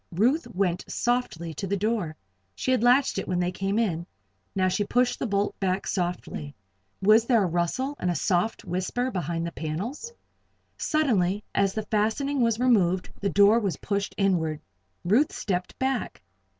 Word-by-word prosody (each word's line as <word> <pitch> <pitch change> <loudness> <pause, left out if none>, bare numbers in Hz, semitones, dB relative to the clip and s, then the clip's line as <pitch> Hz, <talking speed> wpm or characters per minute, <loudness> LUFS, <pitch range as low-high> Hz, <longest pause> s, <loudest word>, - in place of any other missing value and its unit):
Ruth 250 - +2
went 180 -2 -1
softly 240 -10 -1
to 195 +6 -4
the 200 +2 0
door. 205 -6 -1 0.4
She 260 - -1
had 255 - +2
latched 250 +3 +4
it - - -5
when 180 - 0
they 180 0 0
came 195 +3 -2
in. 175 -7 0 0.5
Now 185 -1 +2
she 195 +3 +1
pushed 245 +4 +1
the - - -1
bolt 200 0 -1
back 190 0 0
softly. 175 -5 -3 0.5
Was 215 +3 +6
there 230 -5 +4
a - - +1
rustle 175 - -1
and 180 - 0
a 175 - 0
soft 180 +7 0
whisper 190 +8 -2
behind 170 -3 -2
the 170 - -4
panels? 205 - -4 0.6
Suddenly, 210 - +1
as 195 -1 +2
the 220 - -1
fastening 225 +7 0
was 230 -2 +2
removed, 190 -8 +2
the 200 - 0
door 205 +4 +5
was 195 -8 -2
pushed 200 0 -2
inward. 170 -6 +1 0.5
Ruth 230 +12 +3
stepped 180 -3 -3
back. 260 -2 -2
200 Hz, 165 wpm, -26 LUFS, 180-235 Hz, 0.6 s, Was